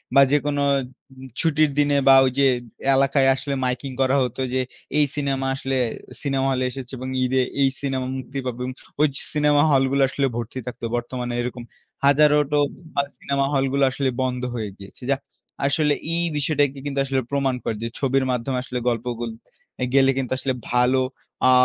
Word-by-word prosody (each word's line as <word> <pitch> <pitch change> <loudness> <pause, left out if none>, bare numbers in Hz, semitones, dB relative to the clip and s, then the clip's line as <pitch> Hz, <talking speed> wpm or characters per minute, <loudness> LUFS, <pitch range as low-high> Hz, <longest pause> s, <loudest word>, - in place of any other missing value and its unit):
বা 140 - +8
যেকোনো 145 0 +1 0.5
উম 130 0 -12
ছুটির 155 -2 +3
দিনে 145 0 +3
বা 135 - +9
ওই 130 - +1
যে 140 - +5 0.5
এলাকায় 135 0 +3
আসলে 140 +1 -4
মাইকিং 125 +2 -2
করা 130 +1 +3
হতো। 125 +1 -3
যে 130 - +2 0.4
এই 150 - +5
সিনেমা 135 -2 -1
আসলে 135 0 -2 0.5
সিনেমা 135 -2 0
হলে 130 -1 0
এসেছে 130 -1 -8
এবং 130 +1 -5
ঈদে 130 +1 +2 0.2
এই 135 - +5
সিনেমা 135 -2 -2
মুক্তি 130 +1 -5
পাবে। 125 0 -3 0.3
ওই 150 -1 +4 0.2
সিনেমা 150 -1 +4
হলগুলা 135 0 +3
আসলে 135 +1 0
ভর্তি 120 +2 -4
থাকত। 125 - -7
বর্তমানে 120 0 -3
এরকম 120 0 -5 0.4
হাজারোটা 150 +1 +4 0.4
ভাল 140 - +1
সিনেমা 140 0 0
হলগুলো 135 0 +2
আসলে 135 0 0
বন্ধ 125 -1 -1
হয়ে 110 -3 -3
গিয়েছে। 100 +5 -14
যাহ 140 -1 +2 0.5
আসলে 150 +1 +2 0.2
এই 170 +1 +1
বিষয়টাকে 145 -1 +1
কিন্তু 140 -1 -2
আসলে 135 -1 0
প্রমাণ 135 -2 +1
করে। 110 - -1
যে - - -1
ছবির 135 -1 +2
মাধ্যম 125 +2 -2
আসলে 125 -1 -4
গল্পগুলো, 120 0 -3 0.6
গেলে 135 -1 +5
কিন্তু 130 -2 -2
আসলে 130 0 -1 0.2
ভালো 125 +2 +3 0.5
আ - - +7
135 Hz, 165 wpm, -23 LUFS, 125-140 Hz, 0.6 s, বা